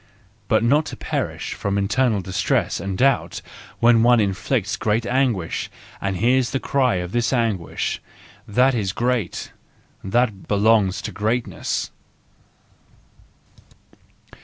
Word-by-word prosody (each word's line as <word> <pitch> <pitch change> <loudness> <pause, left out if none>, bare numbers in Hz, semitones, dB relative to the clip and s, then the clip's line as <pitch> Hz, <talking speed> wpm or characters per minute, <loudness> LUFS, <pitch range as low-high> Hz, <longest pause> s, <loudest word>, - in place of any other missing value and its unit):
But 110 -1 +2
not 145 +6 +3
to - - -6
perish - - -3
from 100 0 -2
internal 105 +2 +1
distress 95 0 0
and 95 -1 -4
doubt 135 0 +1 0.4
when 120 -1 +5
one 120 0 +5
inflicts 100 +2 0
great 110 +2 0
anguish 120 -9 0 0.3
and 95 -1 -1
hears 125 +5 +2
the 135 - -1
cry 130 -5 +1
of 90 0 -3
this 120 +1 0
anguish—that 115 +2 -1
is 100 -5 -1
great, 120 -5 -2 0.5
that 105 0 0
belongs 105 -2 +2
to - - -4
greatness. 115 +3 -2
115 Hz, 110 wpm, -22 LUFS, 100-125 Hz, 0.5 s, when